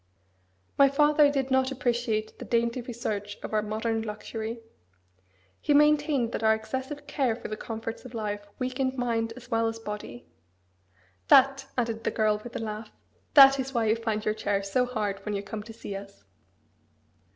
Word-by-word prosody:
My 275 0 +7
father 295 +1 +4
did 270 -2 -1
not 260 0 +3
appreciate 235 -4 -1
the - - -7
dainty 235 +1 0
research 215 -4 -4
of - - -6
our 215 - +3
modern 220 +1 -1
luxury. 220 +1 -5 1.0
He 290 - +2
maintained 295 -4 +3
that - - -3
our 220 0 +4
excessive 265 +6 -5
care 265 -6 0
for - - -8
the 215 - -3
comforts 225 +1 -6
of 255 -2 -10
life 205 -2 -4
weakened 260 +1 -2
mind 230 -2 0
as 255 - -13
well 225 0 +2
as 225 0 -3
body. 210 - -7 1.0
That," 270 0 +5
added 230 -2 -1
the - - +1
girl 215 -1 +1
with 240 - -9
a - - -2
laugh, 215 -1 -5 0.5
"that 275 -1 +9
is 265 0 -4
why 230 -1 +2
you 220 - +4
find 220 -2 -2
your 215 - +2
chair 205 -2 -1
so 250 +6 +1
hard 210 -5 -2
when 210 -1 -3
you 200 - -3
come 210 +1 -6
to 220 +2 -10
see 220 -3 -7
us." 200 0 -10
230 Hz, 175 wpm, -27 LUFS, 215-260 Hz, 1.0 s, that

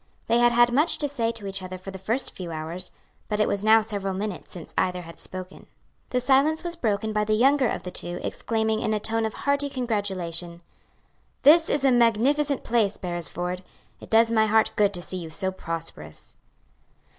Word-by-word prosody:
They 235 - +2
had 240 0 +5
had 240 0 +4
much 300 +6 +3
to 290 - 0
say 235 -5 -1
to 225 -3 -9
each 195 0 -4
other 185 0 -6
for 190 +1 -9
the 190 - -8
first 225 +8 -2
few 175 -3 -6
hours, 165 +3 -2 0.4
but 210 -1 -1
it 210 - +3
was 200 0 0
now 220 +1 +6
several 200 -3 -3
minutes 200 -3 -5
since 175 -3 -8
either 180 -1 0
had 165 0 -12
spoken. 185 0 -8 0.4
The 250 - +1
silence 275 +6 +3
was 345 -1 -3
broken 220 -6 -1
by 210 0 +1
the 215 0 +1
younger 265 +3 +4
of 180 - -3
the 180 - -6
two 175 0 -3
exclaiming 220 -1 -1
in 220 -1 0
a - - 0
tone 220 +1 0
of 220 - -8
hearty 285 0 0
congratulation, 185 -9 -2 0.8
"This 325 +3 +7
is 285 -1 +1
a 270 - +5
magnificent 255 +5 +2
place, 220 -4 +1
Beresford! 175 0 -4 0.4
It - - -12
does 225 +1 +4
my 220 -1 +3
heart 220 +1 +3
good 205 -1 +3
to 175 - -5
see 185 - -5
you 170 -3 -6
so 190 +4 -2
prosperous!" 165 - -7
215 Hz, 200 wpm, -25 LUFS, 185-240 Hz, 0.8 s, This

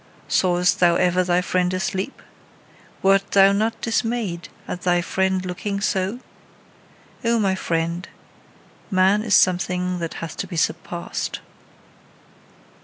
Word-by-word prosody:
Sawest 180 0 +2
thou 175 -1 +5
ever 180 +1 +2
thy 180 0 +2
friend 180 0 0
asleep? 190 +6 -3 0.8
Wert 195 +1 +3
thou 195 0 +7
not 220 +3 0
dismayed 225 -6 -2 0.2
at 180 - -5
thy 180 -1 +2
friend 190 +1 0
looking 190 +3 -3
so? 195 +3 -1 1.0
O 235 0 +2
my 195 -4 +2
friend, 170 -1 -2 0.8
man 190 +2 +3
is 215 -2 +2
something 180 0 +2
that 165 -1 -4
hath 165 -1 -6
to - - -3
be 175 - -6
surpassed. 155 - -2
185 Hz, 120 wpm, -22 LUFS, 180-200 Hz, 1.0 s, thou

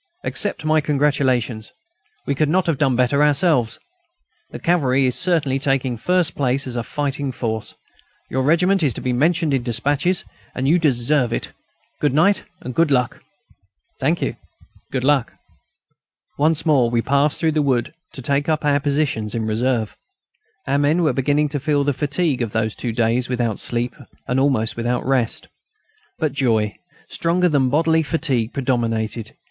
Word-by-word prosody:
Accept 205 -6 -1
my 155 0 +3
congratulations. 135 -6 0 0.5
We 140 - 0
could 150 +2 0
not 185 +3 +2
have 165 -5 0
done 135 -4 +2
better 125 +4 +2
ourselves. 140 -6 +2 0.7
The - - -7
cavalry 140 -6 +2
is 125 - +1
certainly 155 -7 +1
taking 135 -2 0
first 175 +6 +1
place 135 0 0
as 125 -2 -5
a 120 - -1
fighting 140 +2 -2
force. 110 -3 -4 0.5
Your 130 - -1
regiment 180 +7 +3
is 140 -8 +1
to - - -3
be 125 - -1
mentioned 160 +3 +1
in 135 - +1
despatches, 145 +9 0 0.3
and 130 +1 -1
you 170 +5 +4
deserve 130 -3 +1
it. - - -3 0.5
Good 145 -2 +1
night. 195 +6 +3 0.3
Good 165 +4 +2
luck!" 125 -3 0 0.8
"Thank - - 0
you! - - -3 0.5
Good 130 -2 -2
luck!" 135 -3 +2 1.0
Once 155 +2 +1
more 135 -7 +3
we 115 -1 0
passed 140 +2 +2
through 160 -1 +2
the 155 0 +1
wood 130 -4 0 0.2
to 130 - -8
take 140 +4 0
up 155 -1 0
our 145 -1 +3
position 140 -7 -1
in 115 -1 -2
reserve. 110 0 -1 0.7
Our 140 - +1
men 150 +5 +2
were 155 -5 +2
beginning 145 +3 +1
to 145 0 -2
feel 145 +1 +1
the 145 0 +1
fatigue 145 0 -1
of 115 -3 -3
those 110 -1 -1
two 120 - -3
days 115 +2 0
without 120 -4 -1
sleep 120 0 -2 0.3
and 125 +1 +1
almost 130 -5 +1
without 120 +1 -2
rest. 130 -4 0 0.7
But 155 -5 -1
joy, 115 -7 0 0.3
stronger 175 +2 +1
than 140 -4 +2
bodily 160 +3 +2
fatigue, 140 -8 -1
predominated. 115 -4 -2
135 Hz, 165 wpm, -20 LUFS, 120-150 Hz, 1.0 s, you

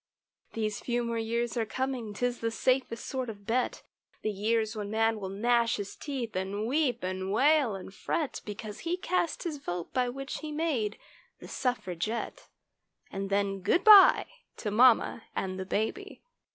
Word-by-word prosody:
These 215 -2 -2
"few 240 0 -1
more 235 -1 -2
years" 235 +1 -1
are 235 - +1
coming, 260 -2 -3
'tis 245 +2 -1
the 230 - 0
safest 250 0 0
sort 260 -3 -3
of 205 -2 -9
bet; 245 +4 -1 0.4
The 215 - 0
years 220 +2 0
when 205 -1 -4
man 225 0 +1
will 190 -2 -5
gnash 230 +3 +2
his 205 -1 -6
teeth, 255 -8 -5
and 195 +3 -2
weep 270 -1 +1
and 185 +1 -3
wail 275 0 +3
and 190 0 -9
fret 285 +8 -2
Because 210 0 -7
he 345 +2 -2
cast 365 -2 -1
his 315 -4 -4
vote 175 -8 -5
by 250 -1 +1
which 275 +3 -5
he 310 -1 -6
made 295 -10 -1 0.4
the - - -10
suffragette— 220 -3 -3 0.6
And 195 0 -4
then 200 -1 0
good 270 - +2
bye 415 -3 +9 0.3
to 210 - -3
mamma 230 0 +4
and 185 0 -3
the 190 - -5
baby. 225 - -3
230 Hz, 165 wpm, -29 LUFS, 205-260 Hz, 0.6 s, bye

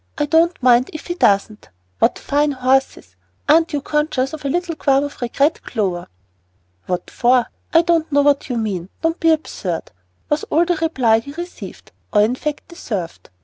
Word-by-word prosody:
I 295 - +1
don't 325 0 +2
mind 245 0 +4
if 310 - -8
he 350 - -3
doesn't. 210 - +1 0.3
What - - +2
fine 290 0 0
horses. 265 +1 0 0.3
Aren't 325 +2 +4
you 290 - -1
conscious 300 -3 -1
of 310 - -7
a 280 - -1
little 350 +3 -1
qualm 275 -2 +2
of 285 -2 -7
regret, 280 +6 +1
Clover?" 190 -6 -3 0.8
"What 180 -1 -3
for? 245 0 +3 0.3
I 330 +1 +5
don't 330 -2 +1
know 285 0 +4
what 285 -1 +2
you 245 - -1
mean. 195 -5 -3
Don't 325 +1 0
be 330 - +3
absurd," 195 - -3 0.4
was 295 +1 0
all 335 +3 +2
the 350 -1 0
reply 260 -9 +2
he 280 +5 -10
received, 345 +3 -9 0.2
or 210 -1 +4
in 225 +3 +1
fact 295 +3 -4
deserved. 205 - -6
285 Hz, 180 wpm, -19 LUFS, 235-320 Hz, 0.8 s, I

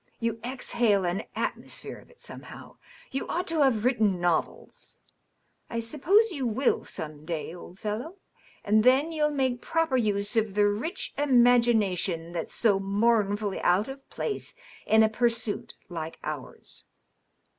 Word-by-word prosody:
You 230 -1 -2
exhale 235 -5 +1
an 175 +4 -1
atmosphere - - -4
of - - -19
it, 485 - -22
somehow. - - -11 0.3
You 270 - -3
ought 355 +2 -1
to 325 -2 +1
have 240 -6 +3
written 215 -7 +2
novels. 175 -2 -2 0.7
I 230 - -2
suppose 335 - +3
you 275 -7 -2
will, 240 +4 +1
some 155 -3 -7
day, 160 -1 -4
old 180 +1 -11
fellow. 220 - -4 0.5
And 215 +1 +3
then 265 +6 +4
you'll 305 -2 +1
make 260 -4 -1
proper 325 -5 +1
use 205 -1 0
of 215 -3 +1
the 205 0 +4
rich 220 - -2
imagination 235 - +3
that's 170 -2 -4
so 205 -4 +3
mournfully 205 0 +1
out 185 +5 +3
of 270 0 -10
place 425 - -4 0.3
in 220 0 +6
a - - +5
pursuit 225 -1 -1
like 165 -2 -6
ours. 150 -4 -7
220 Hz, 145 wpm, -27 LUFS, 195-260 Hz, 0.7 s, in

